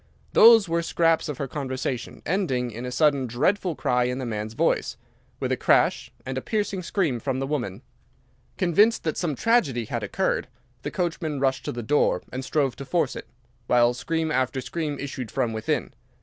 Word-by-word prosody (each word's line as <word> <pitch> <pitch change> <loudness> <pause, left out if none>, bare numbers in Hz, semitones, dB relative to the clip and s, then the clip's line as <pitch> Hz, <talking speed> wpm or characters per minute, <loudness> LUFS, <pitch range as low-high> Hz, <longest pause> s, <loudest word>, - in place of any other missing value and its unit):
Those 225 -3 +8
were 170 0 +1
scraps 165 -1 +1
of 145 - -4
her 140 - -3
conversation, 130 -2 -4
ending 135 -10 0
in 120 +3 -6
a - - -4
sudden 140 -2 +2
dreadful 170 - 0
cry 125 -2 +1
in 125 +1 -1
the 130 - -4
man's 110 -1 -4
voice, - - 0 0.4
with - - -2
a - - +3
crash, - - +2
and 130 0 -3
a - - -10
piercing 205 - -2
scream 170 - 0
from 135 0 -2
the 135 - -1
woman. 125 -10 -3 0.7
Convinced 205 +6 +3
that 155 - -1
some 165 -5 -1
tragedy 140 - +2
had 120 +2 -3
occurred, 190 - -1 0.3
the - - -3
coachman 165 -4 -2
rushed 135 -1 0
to - - -2
the 120 0 -5
door 145 +7 +2
and 130 +1 -4
strove 135 -1 0
to 140 - -6
force 150 -3 0
it, - - -8 0.4
while 120 0 +4
scream 160 +5 -2
after 130 0 0
scream 145 +3 -3
issued 135 -4 -5
from 125 -4 -1
within. 110 0 -2
135 Hz, 185 wpm, -25 LUFS, 125-165 Hz, 0.7 s, Those